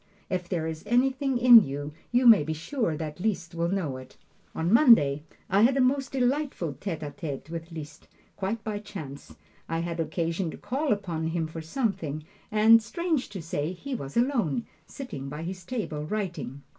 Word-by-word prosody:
If 180 -1 -2
there 170 -4 -1
is 160 -1 -4
anything 265 +3 +2
in 240 -2 +9
you, 145 +2 -5 0.2
you 245 +1 +3
may 225 -7 +9
be 155 +2 -2
sure 165 - -2
that 155 0 -5
Liszt 180 -4 -2
will 170 0 0
know 170 -9 -1
it. 130 0 -13 0.4
On 170 +5 0
Monday 225 - +6 0.3
I 195 +2 +3
had 255 +4 +5
a - - +2
most 265 +1 +2
delightful 260 - 0
tete 170 -6 -4
a 145 - -5
tete 145 0 -6
with 165 0 -6
Liszt, 160 -1 -9 0.3
quite 205 +3 -3
by 210 -2 -3
chance. 160 -10 -9 0.3
I 165 - -1
had 170 0 -4
occasion 165 +2 -1
to - - -8
call 280 +3 -2
upon 175 -6 -1
him 165 0 -1
for 160 +1 -7
something, 160 - -2 0.3
and 220 +2 +6
strange 325 - -2
to 195 -5 -7
say, 155 +1 -2
he 270 +10 -7
was 140 - -5
alone, 235 - +1 0.2
sitting 140 - -7
by 150 +3 -6
his 180 +1 -6
table 170 -8 -4
writing. 170 -8 -4
180 Hz, 180 wpm, -27 LUFS, 155-235 Hz, 0.4 s, in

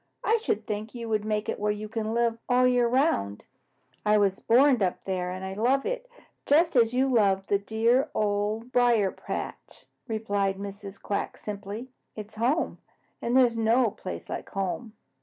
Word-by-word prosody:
"I 455 - +3
should 445 -2 -1
think 215 +1 -5
you 235 -1 -5
would 215 -1 0
make 215 0 -1
it - - -3
where 210 0 +1
you 210 +1 -5
can 220 0 -3
live 235 -1 +1
all 250 0 +4
the 250 - +5
year 245 -1 +3
around." 235 - +1 0.6
"I 210 0 +4
was 200 -2 +2
born 255 0 +4
up 185 -2 0
there, 185 -2 -2
and 185 +1 -5
I 190 - -4
love 250 +7 +1
it - - -3 0.4
just 325 +3 +4
as 230 -2 +5
you 260 +2 +2
love 200 -6 +2
the 200 0 +1
dear 230 +5 +1
Old 210 +3 -1
Briar 235 -6 +3
patch," - - -7 0.2
replied 205 -4 -1
Mrs. 200 0 -8
Quack 200 - -3
simply. 210 +4 -7 0.2
"It 215 -1 -7
is - - -24
home, 245 +9 0 0.4
and 240 +2 +1
there 260 - +7
is 235 -1 -1
no 225 +1 +3
place 185 - -7
like - - -6
home. 195 +4 -3
220 Hz, 185 wpm, -27 LUFS, 200-245 Hz, 0.6 s, there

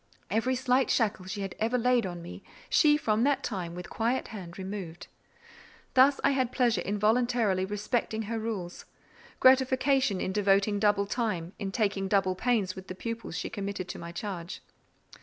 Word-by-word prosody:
Every 250 +4 +1
slight 255 0 +2
shackle 210 -5 +1
she 195 +2 -5
had 195 -2 -4
ever 230 +3 +1
laid 245 -3 +2
on 175 -1 -7
me, 170 - -9 0.3
she, 295 -2 +5
from 220 -6 0
that 280 +2 +2
time, 180 -6 -4
with 180 0 -7
quiet 235 +3 -1
hand 185 -6 -8
removed. 190 -3 -6 0.9
Thus 265 +2 +5
I - - +4
had 260 -3 0
pleasure 235 -7 +2
in 205 +4 -2
voluntarily 220 -3 +2
respecting 220 +2 -2
her 225 +2 -3
rules: 205 -6 -5 0.5
gratification 260 -3 +4
in 185 - -2
devoting 200 0 +2
double 205 -1 +3
time, 200 -6 -2
in 195 -2 -3
taking 200 -2 0
double 195 -1 +2
pains 200 -2 0
with 190 0 -10
the 185 - -6
pupils 230 -3 -5
she - - -4
committed 200 -2 -4
to - - -6
my 170 - -7
charge. 175 -1 -6
210 Hz, 170 wpm, -29 LUFS, 190-245 Hz, 0.9 s, she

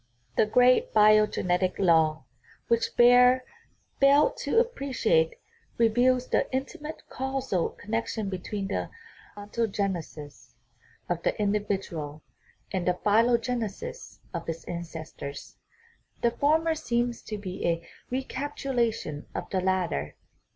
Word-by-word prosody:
The 215 - +3
great 255 - +4
biogenetic 210 -4 +4
law, 160 -5 +3 0.5
which 230 -1 +1
Baer 250 +1 +6 0.6
failed 280 +2 +5
to 285 - -2
appre 460 - +1
ciate, 165 -10 +2 0.4
reveals 245 +2 +3
the - - +1
intimate 285 +4 -5
causal 265 -8 -2
connection 220 0 -3
between 195 +1 -4
the - - -2 0.5
ontogenesis 190 - -4 0.5
of 175 -1 -2
the - - -1
individual 195 -7 -2 0.5
and 185 -2 -1
the 180 - +3
phylogenesis 235 - 0 0.2
of 170 -1 -5
its 165 0 -4
ancestors; 160 -4 -7 0.6
the 235 - +3
former 320 +5 +2
seems 240 -5 -1
to 215 - -6
be 190 -2 -6
a 170 0 -1 0.2
recapitula 260 -2 -1
tion 150 -9 -7
of - - -5
the 185 - 0
latter. 180 - -1
215 Hz, 110 wpm, -27 LUFS, 180-250 Hz, 0.6 s, Baer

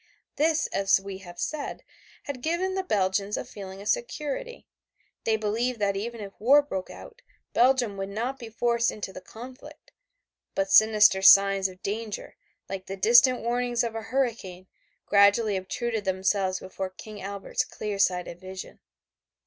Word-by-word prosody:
This, 315 +1 +2
as 195 0 +3
we 195 0 -8
have 175 -2 -12
said, 300 - -4 0.4
had 280 -3 -6
given 345 +6 -1
the 380 - -1
Belgians 200 - 0
a - - -4
feeling 195 -1 -9
of - - -8
security. 485 - -3 0.6
They 225 - +3
believed 225 +4 -1
that 200 -2 0
even 230 +3 -4
if 200 -1 -8
war 280 +6 +5
broke 190 -10 -5
out, 485 0 -12 0.3
Belgium 245 -4 +3
would 195 0 -4
not 240 +6 -3
be 235 -3 -8
forced 235 +1 +1
into 195 -2 -6
the 185 - -9
conflict, 245 +7 -12 0.6
but 195 0 -1
sinister 210 -3 +6
signs 195 0 +6
of 185 -1 -14
danger, 215 +1 -5 0.3
like 190 -1 -6
the 195 - -5
distant 240 +5 +5
warnings 240 +1 0
of 230 -1 -3
a 225 - -4
hurricane, 225 -7 -2 0.4
gradually 200 +1 +4
obtruded 220 +4 -3
themselves 190 0 0
before 190 0 -5
King 205 +2 -11
Albert's 200 0 -3
clear 210 -2 -5
sighted 180 -3 0
vision. 185 0 -9
210 Hz, 155 wpm, -26 LUFS, 195-245 Hz, 0.6 s, sinister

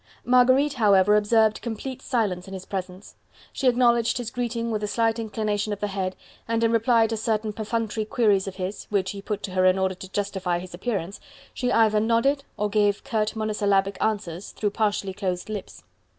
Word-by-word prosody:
Marguerite, 255 +3 +4
however, 210 -4 +4
observed 215 +1 +3
complete 240 +3 -5
silence 200 -8 -1
in 195 - -7
his 190 0 -8
presence: 185 0 -6 0.4
she 265 - 0
acknowledged 240 -2 +3
his 240 -2 -4
greeting 235 -1 -2
with 215 -1 -1
a - - 0
slight 225 +1 +1
inclination 215 -1 -2
of 205 - -6
the 210 - -1
head, 190 -1 -3 0.3
and 230 0 0
in 230 - +3
reply 230 0 +4
to 225 0 -2
certain 215 -1 -1
perfunctory 220 0 -2
queries 210 -4 +2
of 190 - -5
his 190 +2 -5
which 190 -2 -1
he 200 - -7
put 210 0 -4
to 195 - -4
her 185 0 +1
in 185 0 +5
order 190 0 +1
to 190 +1 -11
justify 190 -3 -1
his 180 0 -8
appearance 195 -1 -3 0.3
she 250 -1 -1
either 215 -2 +4
nodded 230 +6 +2
or 210 - 0
gave 205 -1 +1
curt 220 -6 -1
monosyllabic 205 -2 +1
answers 200 -4 -2
through 205 -2 -1
partially 205 -2 -1
closed 185 -1 -3
lips. 210 -2 -7
210 Hz, 190 wpm, -25 LUFS, 195-230 Hz, 0.4 s, in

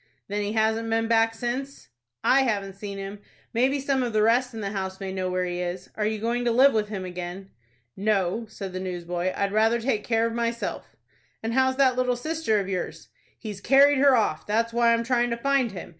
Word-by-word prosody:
"Then 205 +1 -1
he 205 +1 -2
hasn't 220 +1 +1
been 225 0 +1
back 225 0 +3
since?" 250 - -4 0.3
"I 270 - +5
haven't 200 -6 -1
seen 200 0 -7
him. 195 +1 -6 0.3
Maybe 260 +4 +2
some 275 -1 0
of 240 -3 -2
the 215 0 +3
rest 245 +3 +3
in 225 -2 -7
the 200 -1 -3
house 190 -2 -4
may 190 -1 -5
know 185 -1 -2
where 185 0 -1
he 175 0 -3
is. 180 +1 -5
Are 210 -1 -1
you 220 0 -1
going 235 +3 -1
to 240 - +3
live 265 +3 +5
with 215 -1 0
him 195 -3 -4
again?" 180 +2 -7 0.4
"No," 205 +1 0
said 195 -3 -7
the 185 - -3
newsboy; 175 -1 -3
"I'd 200 0 0
rather 225 +2 +3
take 225 -3 -1
care 225 -1 +1
of 230 - -2
myself." 235 0 -3 0.5
"And 225 +1 -2
how's 260 +1 +3
that 260 -2 +3
little 250 -1 +1
sister 305 -4 0
of 195 - -3
yours?" 185 -2 -4 0.3
"He's 210 -4 -7
carried 275 +2 +5
her 275 -1 +6
off. 210 -9 0
That's 230 +2 0
why 235 0 +4
I'm 230 0 +2
tryin' 240 0 +1
to 235 - -2
find 270 -1 +1
him. 185 -3 -8
225 Hz, 220 wpm, -25 LUFS, 195-245 Hz, 0.5 s, her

